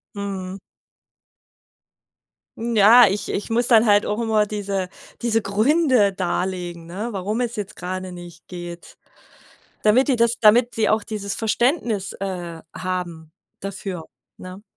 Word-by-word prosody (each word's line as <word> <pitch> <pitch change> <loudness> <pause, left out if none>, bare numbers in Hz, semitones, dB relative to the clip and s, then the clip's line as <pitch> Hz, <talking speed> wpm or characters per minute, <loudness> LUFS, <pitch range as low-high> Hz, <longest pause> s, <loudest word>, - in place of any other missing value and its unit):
Mhm. 195 -2 -5 2.0
Ja, 230 +1 +7
ich 200 +1 -2
ich 205 - -4
muss 235 +2 +1
dann 230 -1 +6
halt 205 0 +5
auch 210 +2 -2
immer 220 -2 +2
diese 200 -3 -3 0.3
diese 225 -1 +1
Gründe 225 +1 +3
darlegen, 180 -2 -3
ne, 195 +7 -5
warum 205 +4 -2
es 240 -1 -2
jetzt 210 -4 -6
gerade 185 +1 -5
nicht 175 -2 -12
geht, 175 -1 -9 0.9
damit 235 +6 +4
die 265 - +3
das 235 0 +3
damit 235 +3 +5
sie 220 -1 +1
auch 215 0 +2
dieses 200 -2 -4
Verständnis, 225 - 0
äh, 175 -4 -5
haben 175 -3 -4 0.3
dafür, 195 -3 -5 0.3
ne? 185 +2 -10
200 Hz, 130 wpm, -22 LUFS, 185-225 Hz, 2.0 s, Ja